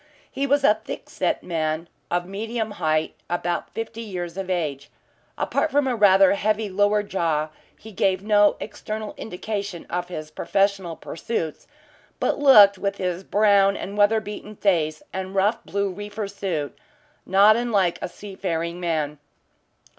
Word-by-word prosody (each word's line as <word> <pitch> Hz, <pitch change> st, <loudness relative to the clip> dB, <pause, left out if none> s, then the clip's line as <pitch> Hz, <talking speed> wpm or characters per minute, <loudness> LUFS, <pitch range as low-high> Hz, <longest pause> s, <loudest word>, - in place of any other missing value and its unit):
He 275 Hz, +1 st, -1 dB
was 285 Hz, +1 st, +2 dB
a 215 Hz, -5 st, +4 dB
thick -, -, -7 dB
set -, -, -1 dB
man 160 Hz, -1 st, -2 dB, 0.2 s
of 175 Hz, 0 st, 0 dB
medium 220 Hz, +3 st, -3 dB
height, 155 Hz, 0 st, +1 dB, 0.2 s
about 175 Hz, 0 st, -2 dB
fifty 225 Hz, 0 st, -6 dB
years 180 Hz, -6 st, -5 dB
of 190 Hz, -1 st, -5 dB
age. 150 Hz, -6 st, -2 dB, 0.5 s
Apart 320 Hz, -, 0 dB
from 290 Hz, 0 st, +2 dB
a 250 Hz, -, +1 dB
rather 195 Hz, -3 st, +6 dB
heavy 210 Hz, 0 st, 0 dB
lower 205 Hz, +2 st, +2 dB
jaw, 165 Hz, -6 st, -1 dB, 0.3 s
he 220 Hz, -, -12 dB
gave 190 Hz, -1 st, +1 dB
no 205 Hz, -1 st, +4 dB
external 215 Hz, 0 st, -6 dB
indication 200 Hz, -2 st, -5 dB
of 175 Hz, 0 st, -2 dB
his 155 Hz, -3 st, -7 dB
professional 195 Hz, 0 st, 0 dB
pursuits, 160 Hz, -2 st, -4 dB, 0.5 s
but -, -, 0 dB
looked, 205 Hz, -9 st, +7 dB
with 200 Hz, 0 st, -2 dB
his 180 Hz, 0 st, -2 dB
brown 200 Hz, -1 st, +4 dB
and 200 Hz, -, -6 dB
weather 210 Hz, +2 st, +4 dB
beaten 210 Hz, 0 st, -8 dB
face 160 Hz, -7 st, +1 dB
and 190 Hz, +1 st, -5 dB
rough 205 Hz, +4 st, +2 dB
blue 200 Hz, 0 st, -1 dB
reefer 205 Hz, +2 st, -5 dB
suit, 185 Hz, -8 st, -3 dB, 0.5 s
not 200 Hz, +3 st, +6 dB
unlike 210 Hz, -7 st, +1 dB
a -, -, -3 dB
seafaring 175 Hz, -3 st, -4 dB
man. 155 Hz, -4 st, -2 dB
195 Hz, 145 wpm, -24 LUFS, 175-210 Hz, 0.5 s, looked